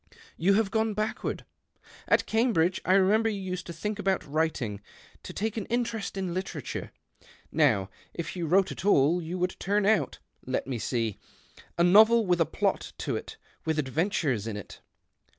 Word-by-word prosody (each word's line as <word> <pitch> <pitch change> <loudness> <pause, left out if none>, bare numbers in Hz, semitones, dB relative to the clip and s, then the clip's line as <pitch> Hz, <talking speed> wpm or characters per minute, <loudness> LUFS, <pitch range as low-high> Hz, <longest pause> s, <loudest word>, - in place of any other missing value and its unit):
You 190 +4 +3
lave 210 -2 +1
gone 220 -1 +1
backward. 215 +1 -3 0.6
At - - +3
Cambridge, 220 -7 +2
I 185 - +3
re 195 +2 +5
nember, 225 0 +2
you 205 - -4
used 185 -2 -5
to - - -5
think 210 +6 -4
about 195 -2 0
writing 145 -9 -1 0.2
— - - -15
;o - - -4
take 220 +2 -3
an 210 - -3
interest 235 -4 -2
in 185 -3 -2
literature. 180 -7 -5 0.6
Now, 95 -1 +3 0.2
if 170 - -5
you 170 -3 -2
>vrote 190 +4 +3
at - - -7
all, 175 -3 +4
you 170 +2 -4
would 180 +1 -1
turn 205 +1 +1
out 215 -1 +2 0.2
— - - -31
let - - 0
me 125 -3 -3
see 115 -3 -2 0.4
^ - - -17
a 170 - +4
novel 220 +5 +6
with 175 -2 +2
a 165 - +3
plot 200 +4 -1
to - - -2
it, - - -6 0.3
with 160 -1 -1
adventures 145 - 0
in\it." 105 -3 -7
185 Hz, 185 wpm, -28 LUFS, 160-210 Hz, 0.6 s, novel